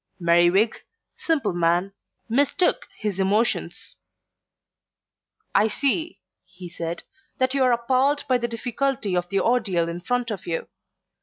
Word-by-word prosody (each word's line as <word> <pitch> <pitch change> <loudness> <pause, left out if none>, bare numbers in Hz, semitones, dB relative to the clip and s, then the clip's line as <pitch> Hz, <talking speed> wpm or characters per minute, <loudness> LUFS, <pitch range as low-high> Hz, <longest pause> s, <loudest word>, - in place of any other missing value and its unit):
Merriwig, 175 +5 +3 0.3
simple 320 - -1
man, 175 +3 +1 0.3
mistook 285 - +1
his 205 -3 -3
emotions. 205 +5 -1 1.6
"I 215 - +4
see," 285 +9 0 0.2
he 185 -1 -12
said, 170 0 -5 0.3
"that 260 0 +1
you 275 - 0
are 255 - +4
appalled 260 +4 +1
by 255 -2 +2
the 235 - -1
difficulty 235 -3 -2
of 175 0 -1
the 195 -1 +1
ordeal 205 -9 +1
in 170 +1 -5
front 245 +3 -1
of 200 - -6
you. 165 -1 -3
220 Hz, 130 wpm, -24 LUFS, 180-255 Hz, 1.6 s, I